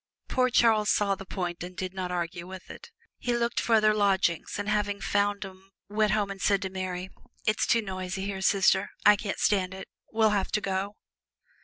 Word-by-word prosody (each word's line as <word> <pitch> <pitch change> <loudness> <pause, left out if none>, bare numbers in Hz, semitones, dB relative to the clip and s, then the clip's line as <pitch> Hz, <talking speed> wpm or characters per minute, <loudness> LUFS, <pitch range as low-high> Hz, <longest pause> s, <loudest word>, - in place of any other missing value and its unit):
Poor 255 0 +2
Charles 220 -3 +4
saw 200 -1 +2
the 195 -1 -8
point 175 -3 -4
and 180 0 -9
did 185 0 -4
not 185 -1 -3
argue 175 0 -4
it. 190 - -10 0.3
He 240 -1 0
looked 235 0 0
for 230 - +2
other 215 -1 +4
lodgings 195 -5 +1
and 205 0 -4
having 205 -1 0
found 205 0 0
'em 190 0 -13 0.2
went 210 0 +2
home 205 -2 0
and 195 - -8
said 200 -1 +3
to 190 - -4
Mary, 185 0 -4 0.3
"It's 215 - +1
too 230 -1 +3
noisy 190 0 -4
here. 195 -1 -4
Sister 190 0 +3 0.2
I 210 0 +8
can't 205 -1 -4
stand 190 -2 +1
it 190 - -8 0.2
we'll 220 -1 +3
have 200 -2 0
to - - +3
go!" 195 0 -2
200 Hz, 195 wpm, -28 LUFS, 190-210 Hz, 0.3 s, I